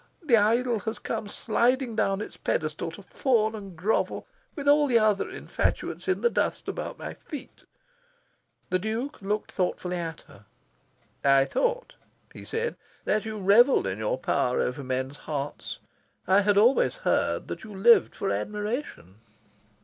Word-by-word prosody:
The 270 -7 +5
idol 230 +2 +2
has 220 +1 -4
come 210 - -4
sliding 240 +3 0
down 195 -2 +1
its - - -7
pedestal - - -2
to - - -11
fawn 225 -5 +1
and 200 -4 -8
grovel 200 +7 0 0.3
with 285 -3 -5
all 290 0 +5
the 245 -3 +4
other 215 -3 +2
infatuates - - -2
in - - +1
the 475 - +4
dust - - -1
about - - -4
my - - -6
feet." 290 -4 -10 1.1
The 185 - +2
Duke 225 +8 -4
looked 210 +2 -2
thoughtfully 180 -1 -2
at 165 -2 -5
her. 100 +1 -18 0.8
"I 135 -1 +5
thought," - - -1 0.4
he - - -10
said, 465 +1 -3 0.3
"that 215 +1 +1
you 220 -1 -4
revelled 210 - +5
in 95 +1 -3
your 110 +3 -1
power 125 -1 0
over 130 +3 -1
men's 130 +2 -3
hearts. 145 -1 -5 0.5
I 190 +2 +5
had 205 0 +2
always 235 +6 +4
heard - - +1
that - - -6
you 220 - -9
lived 230 +5 +5
for 195 - -2
admiration." 210 - -4
210 Hz, 155 wpm, -27 LUFS, 180-240 Hz, 1.1 s, The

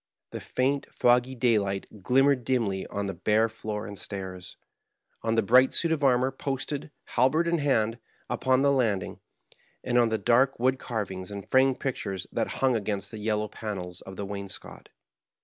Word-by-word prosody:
The - - -5
faint, 140 +2 -1
foggy 125 +2 +3
daylight 105 -4 0
glimmered 135 +4 +3
dimly 115 -7 0
on 100 0 -3
the 95 - -3
bare 110 +6 +2
floor 110 -1 -5
and 100 -2 -7
stairs; 95 -1 -6 0.6
on 115 0 0
the 115 - +3
bright 125 +5 +5
suit 170 - +2
of 155 -3 0
armor 130 0 +3
posted, 140 +2 -4
halbert 135 +8 +2
in 170 -1 +1
hand, 115 -5 +1 0.3
upon 130 +2 +1
the 140 - +4
landing; 115 -8 0 0.6
and 125 -1 +2
on 120 -1 +4
the 110 - 0
dark 125 +5 +3
wood 130 +2 +2
carvings 95 -6 -4
and 100 -1 -7
framed 130 0 +3
pictures 100 -8 -3
that - - -1 0.2
hung 130 -2 +3
against 100 -2 -2
the 110 - -7
yellow 105 0 0
panels 95 -5 -6
of 95 - -10
the 100 - -4
wainscot. 100 -1 -8
115 Hz, 165 wpm, -27 LUFS, 100-130 Hz, 0.6 s, bright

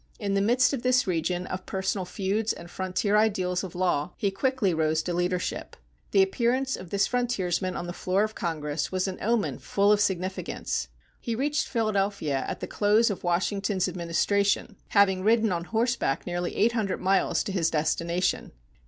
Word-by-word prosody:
In 200 -3 -2
the 195 - +2
midst 245 +6 +3
of 265 - -2
this 255 0 +3
region 175 0 -1
of 185 0 -6
personal 190 0 -2
feuds 200 +4 -1
and 170 0 -11
frontier 190 +2 -1
ideals 190 -4 +1
of 185 -2 -7
law, 175 -3 0
he 200 - 0
quickly 210 -1 0
rose 160 0 +1
to 175 - -2
leadership. 175 0 -2 0.3
The 195 - +5
appearance 250 +6 0
of 185 - -10
this 200 +1 +2
frontiersman 195 -7 -1
on - - -4
the 175 - -5
floor 185 +3 +1
of 215 0 -2
Congress 150 -4 -3
was 185 0 0
an 185 - -5
omen 230 0 0
full 200 +1 +2
of 210 0 +4
significance. 190 -1 -2 0.3
He 235 -2 -3
reached 285 +3 0
Philadelphia 200 - 0
at 185 - -5
the - - -2
close 215 +2 +3
of 195 - -6
Washington's 190 +2 0
administration, 200 +5 0
having 195 -2 +3
ridden 220 0 +3
on 170 -1 -2
horseback 230 - 0
nearly 175 0 -3
eight 225 +3 +3
hundred 215 -5 -1
miles 195 +1 +2
to - - -4
his 170 -4 +1
destination. 170 +3 0
195 Hz, 175 wpm, -27 LUFS, 180-215 Hz, 0.3 s, The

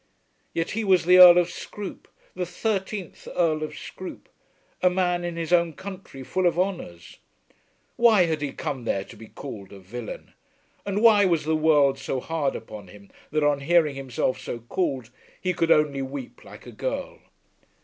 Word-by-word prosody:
Yet 165 +1 -2
he 225 +2 -2
was 185 -4 +3
the 180 +1 +7
Earl 180 -1 +11
of 175 0 +2
Scroope, 205 -2 -8 0.3
the 180 -1 -3
thirteenth 195 0 -3
Earl 160 -3 +2
of 155 - -5
Scroope, 185 - -9 0.5
a 180 - +5
man 180 -1 0
in 175 -1 -4
his 170 +1 -2
own 170 -2 +3
country 190 -6 -9
full 185 +7 0
of 170 -1 0
honours. 175 - -4 0.8
Why 225 -5 +6
had 160 -2 -2
he 145 -2 -2
come 135 -6 -5
there 95 -3 -1
to 110 - -14
be 110 +1 -12
called 105 -8 -9
a 100 - -10
villain? 110 +4 -8 0.5
And 200 +2 -1
why 210 -3 +7
was 170 -4 +2
the 160 0 +1
world 145 -3 +3
so 135 - -3
hard 150 0 -2
upon 105 -3 -9
him 100 +2 -16 0.2
that 155 0 0
on 145 -1 +2
hearing 155 0 +2
himself 130 -1 -2
so 120 - -6
called 130 -3 -2 0.3
he 185 - -1
could 165 -1 0
only 150 -3 +3
weep 135 -1 -7
like - - -13
a - - -9
girl? - - -4
160 Hz, 180 wpm, -25 LUFS, 135-180 Hz, 0.8 s, Earl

